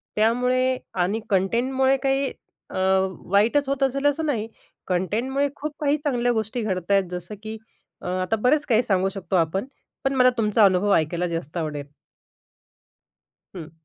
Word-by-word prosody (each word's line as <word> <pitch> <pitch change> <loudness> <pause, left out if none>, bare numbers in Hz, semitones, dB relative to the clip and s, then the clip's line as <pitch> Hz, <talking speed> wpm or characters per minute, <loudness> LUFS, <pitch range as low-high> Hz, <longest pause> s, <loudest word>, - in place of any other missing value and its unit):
त्यामुळे 250 +4 +2 0.3
आणि 205 +5 -1
कंटेंटमुळे 255 +8 +2
काही 270 0 +1 0.4
अ, - - -5 0.5
वाईटच 235 +8 +3
होत 275 0 0
असेल 275 +1 0
असं 290 +2 +2
नाही. 230 -8 -1 0.4
कंटेंटमुळे 230 +10 0
खूप 300 0 -5
काही 295 0 +2
चांगल्या 245 -4 +1
गोष्टी 220 +2 -2
घडता 190 -2 -1
आहेत, 195 -1 +4
जसं 180 +3 -6
की 220 0 -6 0.4
अ, - - -7
आता 185 +4 0
बरेच 295 +5 +3
काही 235 -1 +3
सांगू 195 -3 +1
शकतो 195 0 -4
आपण. 180 +5 +1 0.4
पण 270 - +1
मला 255 -1 +6
तुमचा 210 -1 +4
अनुभव 195 +2 +3
ऐकायला 170 +3 0
जास्त 165 -1 -5
आवडेल. 150 -3 -3 1.7
हं. 165 -2 -8
220 Hz, 145 wpm, -24 LUFS, 185-265 Hz, 1.7 s, मला